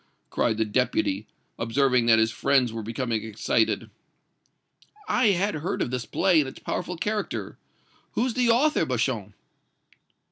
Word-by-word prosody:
cried 110 - +1
the 110 - +1
Deputy, 105 -3 0 0.3
observing 125 +1 +2
that 115 -1 +6
his 110 0 +3
friends 125 +1 +2
were 115 - -4
becoming 115 0 -2
excited. 110 -1 0 1.2
"I 250 -2 +3
had 200 +1 +2
heard 155 +4 -3
of - - -1
this 125 -2 -3
play 185 -4 +3
and 140 -3 0
its - - -13
powerful 180 0 -4
character. 210 +4 -3 0.5
Who's 245 +1 0
the 245 0 +2
author, 260 - +3
Beauchamp?" 115 -7 -2
130 Hz, 140 wpm, -25 LUFS, 115-180 Hz, 1.2 s, that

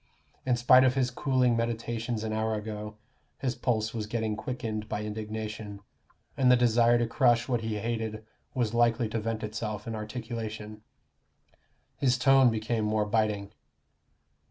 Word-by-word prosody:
In 125 - +3
spite 125 +2 +6
of 130 0 +3
his 130 -2 +1
cooling 125 -2 +2
meditations 115 0 -2
an 110 -1 -2
hour 110 0 0
ago, 105 0 -6 0.4
his 130 -2 -1
pulse 110 -4 -1
was 110 -3 -3
getting 110 -1 -1
quickened 110 -2 -4
by 105 - -2
indignation, 105 -1 -5 0.6
and 130 -2 +4
the - - +8
desire 120 0 +4
to 120 - +1
crush 120 -1 +2
what 120 -3 0
he 110 -1 -2
hated 110 0 -3 0.3
was 120 -4 0
likely 120 0 +3
to 115 - -2
vent 110 0 -3
itself 105 -1 -4
in 115 - -4
articulation. 110 -1 -6 1.2
His 130 -2 +2
tone 135 0 +5
became 110 0 -1
more 105 0 +1
biting. 105 -2 0
110 Hz, 150 wpm, -29 LUFS, 110-120 Hz, 1.2 s, the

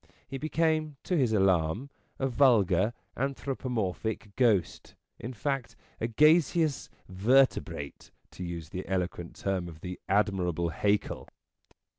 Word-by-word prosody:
He 135 0 -6
became, 155 -1 0
to 180 - -1
his 130 -8 +2
alarm, 95 - +1 0.3
a 135 - 0
vulgar, 120 -4 +3 0.2
anthropomorphic 115 -6 -3
ghost, 110 -9 +1 0.2
in 120 - -5
fact, 135 +1 -3 0.2
a 115 - 0
gaseous 155 +3 +3 0.2
vertebrate, 95 - +1 0.2
to 90 - -8
use 85 -3 -6
the 95 +1 -6
eloquent 90 -2 -3
term 95 -3 -2
of 80 -2 -11
the 90 0 -6
admirable 95 -4 +1
Haeckel. 100 +5 -1
110 Hz, 115 wpm, -29 LUFS, 90-135 Hz, 0.3 s, vulgar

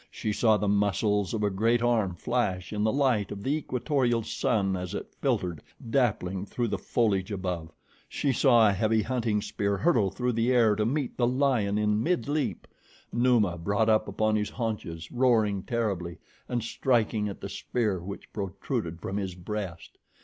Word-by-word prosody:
She 105 - -3
saw 110 0 +4
the 105 - -1
muscles 100 0 +1
of 110 -2 -2
a 105 - +2
great 115 +5 +2
arm 110 -7 +1
flash 95 -3 -1
in 105 0 -1
the 110 - +3
light 130 -7 +1
of 100 -1 -6
the 135 - 0
equatorial 130 -4 0
sun 105 -6 0
as 90 -1 -4
it - - -6
filtered, 85 -4 0 0.3
dappling, 100 -7 0
through 120 -2 -2
the - - -2
foliage 105 -4 0
above. 90 -4 -3 0.4
She 140 - 0
saw 120 -3 +5
a 100 - +3
heavy 110 +2 +1
hunting 115 -4 0
spear 100 -1 -1
hurtle 105 - +3
through 125 +6 -1
the 115 +2 +1
air 115 -4 +4
to 105 +1 0
meet 140 +1 -2
the 120 - +2
lion 125 -6 +1
in 105 0 +1
midleap. 150 -3 -1 0.5
Numa 115 -8 +2
brought 100 +5 +1
up 110 0 +3
upon 110 +2 +1
his 105 -1 0
haunches, 105 -8 -4
roaring 115 -6 +2
terribly 95 -7 -2 0.3
and 120 -2 -1
striking 115 -3 +1
at 100 - -7
the - - -5
spear 105 -1 -1
which 95 +3 -9
protruded 100 -2 -3
from 100 - -3
his 95 -3 -3
breast. 90 -1 -6
105 Hz, 170 wpm, -28 LUFS, 100-120 Hz, 0.5 s, saw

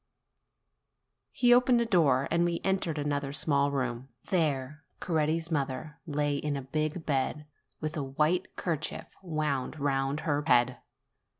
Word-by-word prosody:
He 245 -1 +5
opened 245 0 +5
a 235 - +2
door, 150 - +3
and 170 +1 +3
we 170 -1 0
entered 190 -5 0
another 145 -1 -1
small 140 -1 +2
room: 130 -2 -3 0.2
there 150 -4 0 0.2
Coretti's 160 0 0
mother 145 +1 -2
lay 145 -1 0
in 145 0 -2
a 135 - -5
big 155 +4 -2
bed, 145 +1 -1 0.4
with 155 0 -3
a 155 - -1
white 150 +7 0
kerchief 160 -4 -4
wound 155 -5 -2
round 140 +1 0
her 145 -2 0
head. 125 0 +3
150 Hz, 135 wpm, -29 LUFS, 140-165 Hz, 0.4 s, He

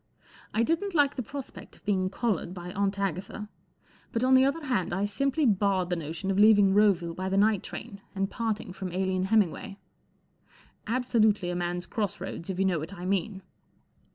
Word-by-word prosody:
1 225 - +3
didn't 335 +7 -1
like 290 -2 +3
the 255 - -2
prospect 270 +3 -8
of - - -24
being 190 -3 +1
collared 190 -4 -2
by 180 0 -7
Aunt 200 0 0
Agatha* 200 +2 -3 0.6
but 230 - -1
on 260 +1 +4
the 260 0 +7
other 295 +3 0
hand 215 -11 0
I 195 +3 0
simply 275 +8 0
barred 195 -4 +2
the - - +2
notion 165 +4 -3
of 195 - 0
leaving 205 -2 +6
Roville 190 -5 +3
by 185 +2 -3
the 195 - 0
night 210 -1 +3
train 205 -4 -8
and 195 0 0
parting 215 -4 -3
from 190 0 -5
Aline 185 0 0
Hem 220 +2 +5
mingway* 195 +2 -5 1.1
Absolutely 220 -6 +2
a - - -3
man's 175 0 -2
cross 210 -6 -3
roads, 180 -1 -6
if 190 - -3
you 195 - +2
know 180 -4 +1
what 165 +6 -7
I 180 - -7
mean. 195 +1 -1
200 Hz, 190 wpm, -28 LUFS, 185-220 Hz, 1.1 s, the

